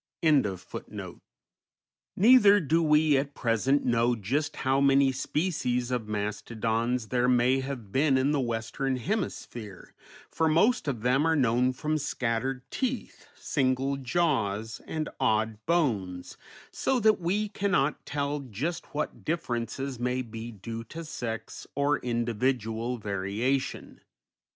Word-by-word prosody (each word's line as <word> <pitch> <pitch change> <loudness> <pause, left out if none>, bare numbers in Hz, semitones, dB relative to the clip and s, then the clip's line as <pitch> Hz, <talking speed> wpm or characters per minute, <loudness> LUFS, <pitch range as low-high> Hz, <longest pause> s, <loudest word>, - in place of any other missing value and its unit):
_ 105 - -1 0.9
Neither 205 -1 +7
do 165 -1 +2
we 150 -2 +4
at 140 +1 -2
present 130 +4 +1
know 120 0 +2
just 130 +8 -2
how 135 +1 +1
many 140 -1 +5
species 130 -3 -1
of 120 -4 -2
mastodons 110 +3 -2
there 125 0 +2
may 125 +1 +3
have 130 -7 -6
been 135 +3 +3
in 135 +2 +2
the 150 - +1
Western 120 +2 -2
Hemisphere, 120 - -4 0.3
for 160 -1 +1
most 170 +5 +3
of 120 -6 -2
them 135 +5 +3
are 165 - +3
known 125 -2 +3
from 155 +4 -2
scattered 125 -1 -2
teeth, 260 -1 -3
single 135 0 0
jaws, 115 -7 -1
and 155 -1 -2
odd 110 -3 +1
bones, 105 - 0 0.4
so 265 - 0
that 215 -1 +4
we 200 +5 0
cannot 195 -9 0
tell 145 0 -2
just 140 - -5
what 150 - -3
differences 135 -4 -3
may 125 +1 -1
be 115 0 -7
due 115 +2 -7
to 165 +5 -8
sex 115 -7 -6
or 145 +1 +2
individual 120 0 -1
variation. 105 +6 -2
130 Hz, 125 wpm, -28 LUFS, 115-150 Hz, 0.9 s, Neither